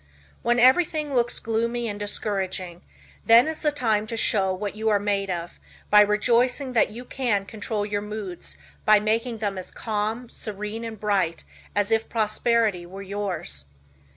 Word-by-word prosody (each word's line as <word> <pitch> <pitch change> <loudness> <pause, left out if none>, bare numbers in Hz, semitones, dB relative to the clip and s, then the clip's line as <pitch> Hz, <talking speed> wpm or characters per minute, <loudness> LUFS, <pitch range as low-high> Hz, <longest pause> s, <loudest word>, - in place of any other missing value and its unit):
When 240 0 +2
everything 300 +3 +3
looks 240 -1 +1
gloomy 235 +1 -1
and 205 -1 -4
discouraging, 190 -4 -2 0.4
then 230 +4 +7
is 315 0 -4
the 300 - +2
time 220 -6 0
to 230 - -4
show 195 -3 +2
what 200 +2 -4
you 220 +1 0
are 210 - +4
made 200 -1 -1
of 175 -1 -4 0.3
by 210 0 +9
rejoicing 245 +5 +2
that 230 - +3
you 235 +4 -9
can 235 -7 -1
control 210 0 -3
your 205 0 -2
moods 200 - -7 0.3
by 215 -1 +6
making 225 +3 0
them 200 -3 -2
as 185 - -8
calm, 220 +2 -3
serene 210 0 -5
and 225 -2 -6
bright 195 -6 0 0.3
as 205 +1 +1
if 225 0 +1
prosperity 220 -3 +1
were 190 +3 -9
yours. 185 - -3
215 Hz, 160 wpm, -25 LUFS, 200-235 Hz, 0.4 s, by